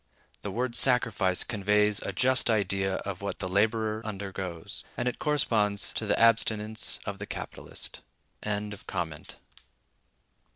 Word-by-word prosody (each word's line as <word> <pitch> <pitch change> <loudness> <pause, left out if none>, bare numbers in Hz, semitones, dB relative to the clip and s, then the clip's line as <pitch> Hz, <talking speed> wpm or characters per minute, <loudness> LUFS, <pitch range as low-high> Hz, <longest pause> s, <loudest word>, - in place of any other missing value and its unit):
The 100 - -4
word 120 +5 -1
"sacrifice" 115 -7 +4
conveys 105 0 +2
a - - -3
just 130 +6 +3
idea 100 -3 +1
of 100 -2 -4
what 100 - -3
the 95 - -3
laborer 110 +3 +1
undergoes, 95 -5 -5
and 125 - -1
it 125 - -2
corresponds 105 - +1
to 60 - -2
the - - +2
abstinence 110 -1 +2
of 100 -2 -4
the 100 - -6
capitalist. - - -7
105 Hz, 120 wpm, -29 LUFS, 100-115 Hz, -, sacrifice